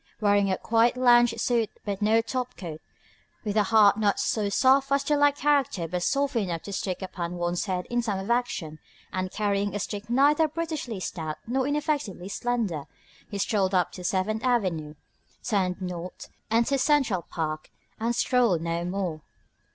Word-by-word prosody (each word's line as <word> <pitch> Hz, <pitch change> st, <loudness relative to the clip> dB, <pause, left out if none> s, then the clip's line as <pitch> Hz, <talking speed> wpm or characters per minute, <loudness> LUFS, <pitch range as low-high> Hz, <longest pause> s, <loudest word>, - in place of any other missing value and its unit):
Wearing 205 Hz, -1 st, +3 dB
a 190 Hz, -, +1 dB
quiet 230 Hz, +2 st, +2 dB
lounge 240 Hz, -2 st, +5 dB
suit 230 Hz, -1 st, +1 dB, 0.2 s
but 200 Hz, -1 st, -3 dB
no 220 Hz, +2 st, +4 dB
top 250 Hz, +1 st, -4 dB
coat, 160 Hz, -4 st, -7 dB, 0.6 s
with 205 Hz, -1 st, -2 dB
a 210 Hz, -1 st, +3 dB
hat 210 Hz, 0 st, +5 dB
not 205 Hz, -2 st, +2 dB
so 210 Hz, -2 st, 0 dB
soft 270 Hz, +6 st, +3 dB
as 280 Hz, 0 st, +3 dB
to 295 Hz, -, +1 dB
lack 290 Hz, 0 st, +4 dB
character 280 Hz, -, +1 dB
but 180 Hz, +2 st, -3 dB
soft 280 Hz, +6 st, 0 dB
enough 180 Hz, -7 st, -1 dB
to 200 Hz, -, -7 dB
stick 190 Hz, 0 st, -3 dB
upon 175 Hz, -2 st, -4 dB
one's 175 Hz, 0 st, -1 dB
head 185 Hz, -2 st, -2 dB
in 240 Hz, 0 st, 0 dB
time 210 Hz, -4 st, -2 dB
of 195 Hz, +4 st, -3 dB
action, 180 Hz, -10 st, -1 dB, 0.3 s
and 185 Hz, 0 st, -2 dB
carrying 205 Hz, -1 st, -1 dB
a -, -, -1 dB
stick 205 Hz, +2 st, -5 dB
neither 290 Hz, +5 st, +4 dB
brutishly 310 Hz, -, -4 dB
stout 160 Hz, -4 st, -4 dB
nor 260 Hz, +3 st, 0 dB
ineffectively 290 Hz, -, -2 dB
slender, 210 Hz, -9 st, -2 dB, 0.4 s
he 200 Hz, -, -5 dB
strolled 195 Hz, -1 st, +1 dB
up 180 Hz, -2 st, +2 dB
to 180 Hz, -, -9 dB
Seventh 195 Hz, +5 st, -1 dB
Avenue, 180 Hz, -12 st, 0 dB, 0.5 s
turned 190 Hz, -4 st, 0 dB
north, 180 Hz, -1 st, -6 dB, 0.2 s
entered 235 Hz, +5 st, +2 dB
Central 260 Hz, -, +2 dB
Park 155 Hz, -2 st, -4 dB, 0.3 s
and 230 Hz, +2 st, 0 dB
strolled 235 Hz, -11 st, +2 dB
no 170 Hz, 0 st, -2 dB
more. 180 Hz, -3 st, -3 dB
205 Hz, 170 wpm, -26 LUFS, 185-245 Hz, 0.6 s, lounge